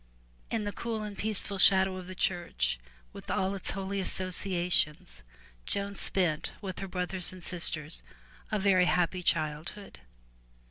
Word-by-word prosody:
In 225 -2 -1
the 205 - -2
cool 225 0 -3
and 210 -1 -5
peaceful 205 -2 -2
shadow 190 0 +6
of 185 -1 -8
the 185 - -7
church 115 - 0 0.3
with - - -10
all 190 +1 +1
its 195 - -1
holy 195 0 -2
associations, 180 -3 0 0.5
Joan 200 0 -1
spent 180 -5 0
with 190 -3 -6
her 195 - -4
brothers 180 0 -2
and 185 -1 -9
sisters 165 -3 +1 0.5
a 215 - +2
very 190 -2 +4
happy 180 +1 +1
childhood. 155 - -1
185 Hz, 140 wpm, -30 LUFS, 175-200 Hz, 0.5 s, shadow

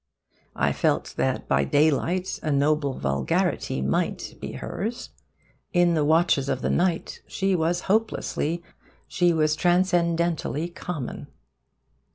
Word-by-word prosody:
I - - +1
felt - - 0
that - - -1
by 70 0 +2
daylight 155 - +1
a 155 - -1
noble 140 -1 +1
vulgarity 70 -1 0
might 70 +1 -1
be - - -5
hers. 225 +6 -5 0.6
In 175 -1 +4
the 155 -2 +2
watches 155 -3 +3
of - - -2
the - - +1
night 175 -1 0
she 195 -1 0
was 175 +1 0
hopelessly, 185 -5 -1 0.4
she 175 -1 +2
was 155 -2 +2
transcendently 170 -2 +1
common. 175 -6 -6
170 Hz, 120 wpm, -25 LUFS, 145-175 Hz, 0.6 s, In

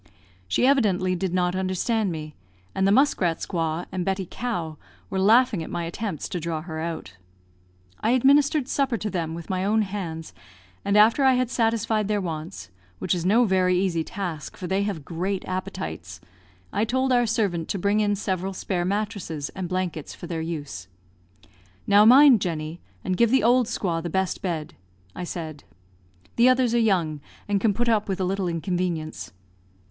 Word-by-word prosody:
She 95 - +2
evidently 200 -9 +3
did 185 0 -2
not 180 0 +1
understand 190 +3 0
me; 155 -2 -6 0.4
and 190 0 +1
the - - +4
Muskrat 200 - +3
squaw, 165 -1 -2
and 185 -1 -2
Betty 190 +1 -1
Cow, 175 -10 -4 0.3
were 190 - -1
laughing 220 0 +4
at 160 - -6
my 170 - -3
attempts 170 0 -4
to 180 - -3
draw 165 -1 -3
her 160 -2 -6
out. 160 - -5 0.8
I 220 - 0
administered 280 +2 +4
supper 275 -4 0
to 210 +1 -4
them 165 -3 -2
with 170 +2 -7
my 185 0 -1
own 215 +2 +2
hands, 175 -5 -5 0.5
and 200 +1 +2
after 225 +6 +5
I 265 -1 +6
had 250 -1 0
satisfied 225 -3 +1
their 210 -1 +1
wants 155 - -6 0.3
(which - - -1
is 175 -1 -1
no 230 +5 +5
very 185 -2 +2
easy 180 -3 0
task, 175 -5 -6
for 185 - -6
they 190 +2 0
have 195 -8 -3
great 185 +3 -3
appetites), 90 - -5 0.5
I 210 - +1
told 260 +3 0
our 245 -1 +3
servant 190 -7 0
to - - -1
bring 200 +3 +1
in 205 -1 +2
several 190 -1 -2
spare 180 -2 -2
mattresses 200 -7 -3
and 185 -3 -6
blankets 180 -5 -3
for - - -9
their 165 -2 -3
use. 145 - -5 1.0
"Now 205 +1 +6
mind, 255 -1 +8
Jenny, 160 -1 -3 0.2
and 185 - -1
give 235 +3 +3
the 265 +1 +3
old 245 0 +4
squaw 180 -7 -2
the 170 - -4
best 190 +2 -1
bed," 165 -5 -3 0.4
I 180 - -4
said; 155 -4 -6 0.7
"the 240 +2 +6
others 255 -2 +3
are 240 - +3
young, 175 -9 +1 0.3
and 200 -1 0
can 220 - +3
put 235 +4 -1
up 215 -3 +1
with 190 - -1
a - - 0
little 190 0 -1
inconvenience." 170 -2 -3
190 Hz, 180 wpm, -25 LUFS, 165-215 Hz, 1.0 s, mind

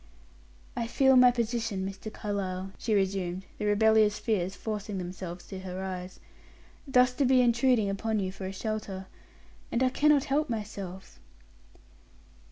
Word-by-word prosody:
"I 235 -1 -2
feel 265 +2 +4
my 250 0 +8
position, 230 -5 -1
Mr. 195 +2 -7
Carlyle," 195 -3 -4
she 220 -2 0
resumed, 190 -2 -1
the - - -2
rebellious 215 0 +4
tears 195 -4 -1
forcing 210 -2 -4
themselves 180 -1 -6
to 190 - -6
her 185 0 -6
eyes; 185 -1 -6 0.7
"thus 250 -1 +4
to 280 - 0
be 260 0 +4
intruding 240 -2 +3
upon 215 +2 -1
you 190 -1 -2
for 190 0 -6
a - - -4
shelter. 195 -2 -4 0.7
And 235 - +1
I 255 - +4
cannot 290 +1 +3
help 290 +2 0
myself." 200 -4 -6
210 Hz, 145 wpm, -29 LUFS, 190-240 Hz, 0.7 s, my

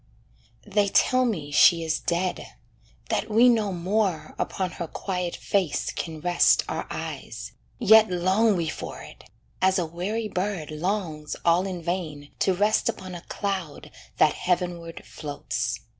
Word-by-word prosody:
They 205 -1 +2
tell 255 +5 +3
me 160 -11 -2
she 165 +3 +6
is 160 0 0
dead, 175 -3 -2 0.5
that 215 - -1
we 225 +3 +6
no 220 -4 +3
more 185 0 -1
Upon 185 -2 -2
her 170 - -2
quiet 180 0 -3
face 190 -7 -1
can 160 -2 -5
rest 175 +1 +4
our - - -4
eyes, - - -6 0.3
Yet 220 -1 +6
long 190 +5 +2
we 170 -2 -1
for - - -6
it, - - -13 0.4
as 190 +1 +4
a 180 - +1
weary 195 +7 -3
bird 185 -5 -3
Longs 160 -2 -3
all 175 +3 +3
in 180 -3 -5
vain 160 -5 -4
to 190 - +2
rest 210 +3 +2
upon 185 -1 -5
a 175 - -7
cloud 190 -8 -4 0.3
That - - +5
heavenward 175 -2 -2
floats. 115 -7 -4
180 Hz, 145 wpm, -25 LUFS, 165-200 Hz, 0.5 s, she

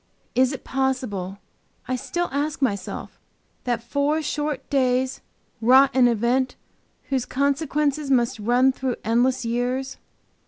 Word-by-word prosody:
Is 255 0 +3
it 275 - -6
possible, 250 -8 -2 0.5
I 255 - 0
still 275 +8 -2
ask 290 +2 -1
myself, 210 -8 -3 0.5
that 240 -2 -1
four 285 +5 0
short 295 -1 -3
days 260 -1 +1 0.4
wrought 260 +4 +6
an 255 -2 +6
event 245 +3 +1 0.5
whose 265 -3 +1
consequences 285 +1 0
must 245 -3 +2
run 245 +5 +3
through 260 -2 -2
endless 245 +3 +1
years? 245 +3 -2
260 Hz, 120 wpm, -24 LUFS, 245-275 Hz, 0.5 s, wrought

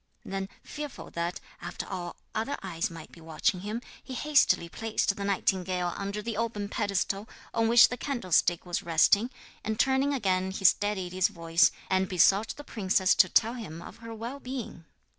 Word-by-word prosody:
Then, 195 0 -4
fearful 295 -2 -7
that 170 +1 -3 0.2
after - - -5
all 175 -2 -5 0.2
other 225 +6 -2
eyes 175 -2 -2
might 165 -2 -10
be 170 - -15
watching 165 +5 0
him, 215 +5 -4 0.2
he 260 - -7
hastily 290 - +3
placed 215 +2 -1
the 200 - -5
nightingale 185 -2 0
under 200 +1 -4
the 225 -2 -3
open 215 -3 -2
pedestal 200 -1 -1 0.2
on 225 0 +2
which 235 +1 +8
the 250 - -4
candlestick 185 - +1
was 175 0 -2
resting, 195 +6 +4 0.3
and 220 0 -3
turning 265 +2 +3
again 190 -8 +1
he 195 +1 -5
steadied 190 -2 +3
his 185 0 +3
voice, 165 -1 +3 0.2
and 190 0 +1
besought 195 +4 +3
the 290 - -8
princess 190 -6 +2
to - - +5
tell 230 +1 +3
him 205 -10 -7
of 175 - -11
her 230 0 -9
well 235 +5 -6
being. 250 -10 -6
200 Hz, 175 wpm, -29 LUFS, 180-230 Hz, 0.3 s, which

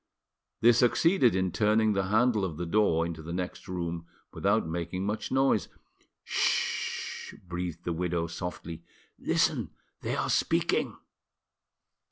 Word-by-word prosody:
They 120 +1 +8
succeeded 125 - +4
in 95 -1 +1
turning 110 +1 +3
the 95 -1 0
handle 110 +1 +3
of 85 -5 -3
the 85 - -3
door 85 -3 +2
into 85 -2 -5
the 80 +2 -7
next 90 +3 -4
room 85 -2 -4 0.3
without 100 +1 +2
making 85 +3 -3
much 105 +2 -3
noise. 135 -5 +3 0.6
"'Sh!" - - -1
breathed 90 -1 -4
the 85 - -1
widow 85 0 -1
softly; 85 -1 -6 0.4
"listen, - - +1 0.3
they - - -2
are - - -1
speaking." - - +1
90 Hz, 130 wpm, -29 LUFS, 85-110 Hz, 0.6 s, They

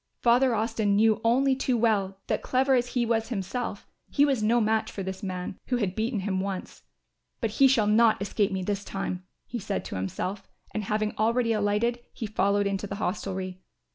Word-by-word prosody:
Father 245 +1 +4
Austin 215 -2 +1
knew 220 +1 +4
only 260 +4 +3
too 260 -2 0
well 205 -4 +1
that, - - -1
clever 265 +1 +2
as 245 -1 +3
he 245 -2 +2
was 225 -1 0
himself, 210 0 -3 0.2
he 285 - +4
was 270 -6 +1
no 230 +3 +3
match 220 0 +1
for 195 - -5
this 190 +1 -5
man, 185 -2 -5
who 250 - +1
had 200 -6 -1
beaten 225 -1 -1
him 190 -1 -1
once; 190 -1 -4 0.6
"But 225 -4 -1
he 270 +5 +5
shall 250 -5 +3
not 220 +1 +4
escape 200 +1 0
me 190 -1 -2
this 200 +1 -2
time," 185 -2 -4 0.2
he 240 - -5
said 200 -1 -3
to - - -6
himself, 140 - -4 0.2
and 215 -1 -3
having 215 +1 -1
already 230 +1 +2
alighted, 215 +3 +1
he 225 - -5
followed 205 -1 +1
into 200 0 -1
the 200 - -5
hostelry. 185 -2 -3
215 Hz, 195 wpm, -27 LUFS, 195-235 Hz, 0.6 s, he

